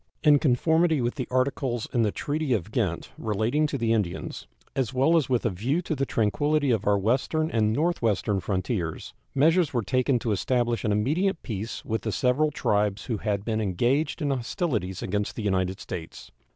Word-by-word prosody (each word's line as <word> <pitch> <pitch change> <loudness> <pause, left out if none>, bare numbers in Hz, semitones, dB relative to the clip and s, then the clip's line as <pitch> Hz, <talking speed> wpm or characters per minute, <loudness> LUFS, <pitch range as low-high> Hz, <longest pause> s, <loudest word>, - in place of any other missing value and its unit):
In 150 -2 +6
conformity 160 +4 +3
with 120 0 0
the 130 - -4
articles 130 -2 0
in 120 - +2
the 105 -2 +2
treaty 145 +1 -1
of 105 -1 -2
Ghent 100 -8 -1
relating 110 +8 +1
to 140 - -3
the 115 -2 +1
Indians, 100 - -3 0.3
as 130 -2 -1
well 140 +6 +4
as 155 -6 +2
with 125 -2 +1
a 115 - +2
view 120 - -1
to 165 - -2
the 135 -2 -1
tranquillity 145 +6 +1
of 110 -3 0
our 100 0 +4
western 130 +10 0
and 110 -2 +2
northwestern 115 - +1
frontiers, 95 -3 -3 0.2
measures 160 +4 +3
were 120 - +1
taken 130 +5 +1
to 115 -1 -2
establish 120 +3 0
an 105 - +1
immediate 160 - 0
peace 110 -1 -5
with 110 0 -1
the 110 - -2
several 125 +9 +2
tribes 105 -7 0
who 115 -4 -2
had 105 -1 -2
been 110 -1 0
engaged 125 - 0
in 145 - +1
hostilities 120 - -2
against 105 +1 -2
the 110 - -4
United 95 -1 0
States. 85 -4 -8
120 Hz, 185 wpm, -26 LUFS, 105-145 Hz, 0.3 s, In